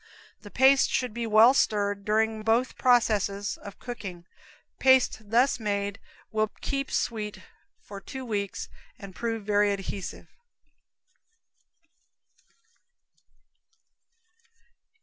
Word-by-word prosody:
The 205 - -11
paste 265 +4 +4
should 250 -4 -1
be 235 0 -3
well 220 +4 +6
stirred 205 -5 0
during 220 +1 +1
both 225 +4 +1
processes 210 -5 +1
of 200 - -11
cooking. 195 -8 -8 0.5
Paste 260 -5 +3
thus 245 +3 +3
made 200 -1 -2 0.3
will 215 0 0
keep 275 0 -3
sweet 210 -4 -3 0.4
for 200 -1 -10
two 265 +2 -8
weeks 200 -4 -3 0.3
and 195 -2 -11
prove 225 +1 -3
very 205 0 +2
adhesive. 195 -1 -6
215 Hz, 95 wpm, -27 LUFS, 200-240 Hz, 0.5 s, well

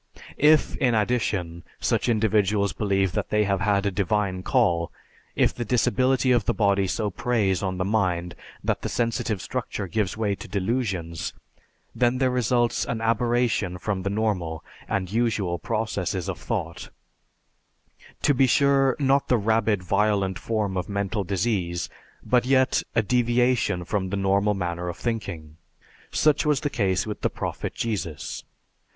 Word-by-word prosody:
If, 155 +1 +4
in 125 -4 +2
addition, 100 -7 -1 0.2
such - - 0
individuals 105 -2 +2
believe 95 -3 +1
that 105 +1 -3
they 105 0 +2
have 100 -2 0
had 100 -1 +1
a 100 - +1
divine 95 -1 0
call, 90 -8 +1 0.4
if - - +3
the 120 - -4
disability 130 +2 +2
of 120 -5 +3
the - - 0
body 100 -2 +2
so 105 +2 -1
preys 100 -3 0
on 95 -2 -2
the 95 - -1
mind 90 -4 0 0.3
that - - -1
the - - -3
sensitive 115 -4 -1
structure 120 -5 -4
gives 100 +2 -2
way 105 -2 0
to - - -8
delusions, 95 - -2 0.6
then 125 0 +2
there 130 -1 +2
results 120 -1 +1
an 115 - -3
aberration 115 -4 +1
from 95 +1 -2
the 100 - -2
normal 100 -7 -2 0.2
and 95 -1 -1
usual 105 -6 0
processes 95 -2 -2
of - - -4
thought, 85 +2 -4 1.3
to 145 - +4
be 135 0 +4
sure 135 0 +3
not 140 -1 +2
the 125 - +3
rabid, 110 -2 +1
violent 100 0 +1
form 105 -4 -1
of 90 +4 -3
mental 100 +1 -1
disease, 95 -3 -1 0.3
but 125 -1 +2
yet 130 0 +3
a 115 - +3
deviation 120 -4 +1
from 95 0 -1
the 100 - -2
normal 100 +2 +2
manner 90 -1 -3
of 85 - -6
thinking. 85 -10 -4 0.5
Such 150 -2 +3
was 150 -3 +1
the 145 - -2
case 95 -4 0
with 105 -1 -5
the - - +1
Prophet - - -5
Jesus. 85 - -3
105 Hz, 155 wpm, -25 LUFS, 95-120 Hz, 1.3 s, If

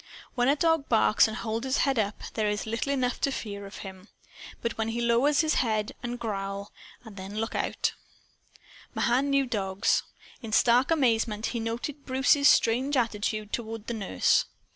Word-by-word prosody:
When 245 -1 +1
a 285 - +4
dog 325 -1 +1
barks 220 -2 +4
and 220 - -5
holds 225 +1 -3
his 265 - +1
head 270 -4 +1
up, 205 0 -2
there 215 -2 0
is 210 0 -2
little 230 +5 -2
enough 255 -3 -1
to 275 - +1
fear 200 -5 -6
from - - -10
him. 190 +1 -11 0.6
But 235 - -2
when 220 0 -2
he 225 +1 -3
lowers 240 +6 +3
his 315 -1 +1
head 215 -4 -1
and 240 0 -4
growl 200 -2 -4 0.3
then 200 -2 -9
look 225 +1 -2
out. - - -1 1.0
Mahan 260 +4 +1
knew 275 -1 +3
dogs. 200 -4 0 0.4
In 225 -3 -7
stark 245 +3 +4
amazement 230 -8 +1
he 235 - -2
now 225 0 -2
noted 280 +4 -6
Bruce's 280 +2 +4
strange 260 +5 +3
attitude 215 -2 -1
toward 225 -2 -4
the 235 - -4
nurse. 195 - +2
230 Hz, 175 wpm, -27 LUFS, 215-260 Hz, 1.0 s, a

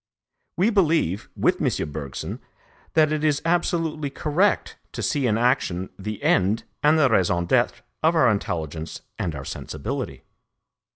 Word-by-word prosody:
We 195 +7 +3
believe, 160 - +1
with - - +1
M. 75 - 0
Bergson, 70 -2 -5 0.6
that 155 -1 +5
it 155 0 -1
is 150 -2 +2
absolutely 165 -3 0
correct 160 +8 +1 0.2
to - - -4
see 140 -4 +1
in 110 -1 +2
action 115 -7 +1
the 105 +1 -5
end 100 +5 +2 0.2
and 150 +2 +5
the 155 -3 +5
raison 90 -6 +2
d'être - - +1 0.2
of 160 +2 +3
our 160 - +5
intelligence 80 -6 -3 0.2
and 85 -4 -2
our 70 0 -6
sensibility. - - -5
125 Hz, 140 wpm, -24 LUFS, -, 0.6 s, that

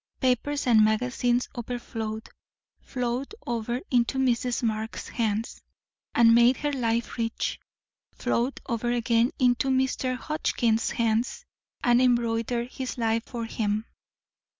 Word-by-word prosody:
Papers 265 +3 +1
and 225 -4 +6
magazines 245 +2 +1
overflowed, 225 -2 -5 0.5
flowed 250 - -3
over 240 +1 -2
into 245 +1 +2
Mrs. 245 -2 +1
Marx's 220 0 -2
hands, 220 -1 -2 0.5
and 230 -1 +7
made 240 +2 +5
her 295 -1 -2
life 235 -2 -1
rich; 225 0 -2 0.6
flowed 245 +4 -1
over 240 0 -1
again 235 0 +2
into 250 0 +2
Mr. 260 -1 +1
Hotchkiss's 240 -6 0
hands, 230 +1 0 0.4
and 240 +1 +4
embroidered 235 0 +1
his 260 -1 -5
life 225 -1 0
for 235 -2 -5
him. 215 -1 -1
240 Hz, 115 wpm, -26 LUFS, 230-250 Hz, 0.6 s, and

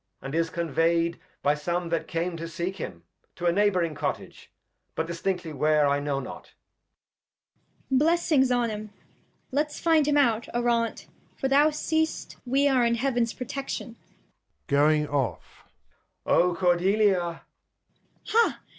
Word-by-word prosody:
And 135 - -7
is 165 0 +1
convey'd 170 0 0 0.2
by 145 - +4
some 170 +4 -2
that 165 -1 -1
came 170 +1 -2
to 165 +1 -5
seek 175 +3 -4
him, 85 - -7 0.3
To 175 - -5
a 170 - +4
Neighb'ring 185 -4 +2
Cottage; - - -5 0.4
but 160 - -1
distinctly 170 0 -3
where, 150 0 +3
I 140 0 +2
know 145 -1 -1
not. 135 - -9 1.3
Cord. 265 -1 +3
Blessings 305 -4 +3
on 240 -2 +1
'em; 215 0 -6 0.6
Let's 295 +3 -1
find 320 -3 +3
him 295 -1 +3
out, 235 -5 +2
Arante, 235 -1 0 0.3
for 270 - -1
thou 285 +3 +5
seest 315 +1 -2
We 275 +3 +3
are 260 -3 +3
in 235 0 +2
Heavens 240 -2 0
Protection. 255 -2 -5 0.7
[Going 150 +2 +3
off. 130 - -3 0.6
Edg. - - -2
O 180 0 +4
Cordelial 190 +2 +3
Cord. 170 -1 -5 0.9
Ha 460 +1 +2
185 Hz, 140 wpm, -26 LUFS, 165-255 Hz, 1.3 s, thou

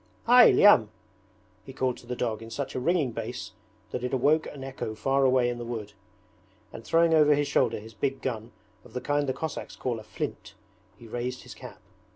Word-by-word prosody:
'Hy, 245 +1 +8
Lyam!' 130 - +6 0.7
he 135 - -11
called 130 -1 -1
to 120 - -15
the 125 - -3
dog 115 -3 -2
in 115 - -9
such 140 +4 -4
a - - -2
ringing 150 -1 +1
bass 115 +2 -6 0.4
that 125 - -4
it 125 +1 -1
awoke 150 +5 +2
an 140 -2 -9
echo 130 -5 -5
far 135 +5 +1
away 130 -1 +3
in 120 0 -3
the - - -5
wood; 110 -3 -6 0.8
and 115 - -9
throwing 165 +7 +3
over 150 -2 +5
his 145 0 0
shoulder 125 -5 +1
his 110 +2 -12
big 135 +5 -2
gun, 115 -2 -4 0.3
of 120 - -17
the 125 - -2
kind 145 +1 0
the - - +1
Cossacks 160 +1 -5
call 120 -3 -3
a - - -11
'flint', - - -6 0.4
he 115 - -13
raised 125 +3 -4
his 125 - -10
cap. 110 - -11
125 Hz, 205 wpm, -27 LUFS, 115-140 Hz, 0.8 s, Hy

